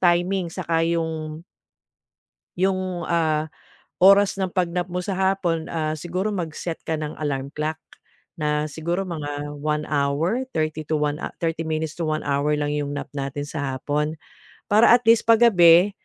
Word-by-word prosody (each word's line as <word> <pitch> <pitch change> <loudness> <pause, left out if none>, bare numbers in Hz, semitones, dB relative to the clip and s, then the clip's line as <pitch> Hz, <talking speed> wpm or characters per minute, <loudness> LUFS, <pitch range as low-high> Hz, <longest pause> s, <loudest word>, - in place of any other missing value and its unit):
timing, 175 +1 +2
saka 165 0 -1
'yung 160 -1 -3 1.1
Yung, 185 -2 -1
ah, 160 -2 +1 0.5
oras 200 +1 +6
ng 190 -2 -2
pag-nap 180 -1 -1
mo 180 - -2
sa 190 +1 -3
hapon, 190 -4 0
ah, 155 -1 -1
siguro 180 +6 -3
mag-set 165 -1 -4
ka 160 -1 -2
ng 150 -1 -4
alarm 140 -3 -2
clock 155 +1 -2 0.6
na 150 -1 0
siguro 170 +5 -3
mga 145 -2 -5
1 150 +1 -2
hour, 155 - 0
30 155 0 -2
to 155 0 -1 0.4
30 165 -1 -1
minutes 155 0 -3
to 170 - -2
1 155 0 -1
hour 140 +1 +1
lang 150 0 0
'yong 145 -1 -2
nap 145 - -5
natin 140 +1 -4
sa 140 -4 -3
hapon 150 +3 -1 0.6
para 215 +3 +6
at 245 0 +4
least 225 0 +4
pag 230 +1 +6
gabi 180 -3 +6
160 Hz, 155 wpm, -23 LUFS, 150-180 Hz, 1.1 s, oras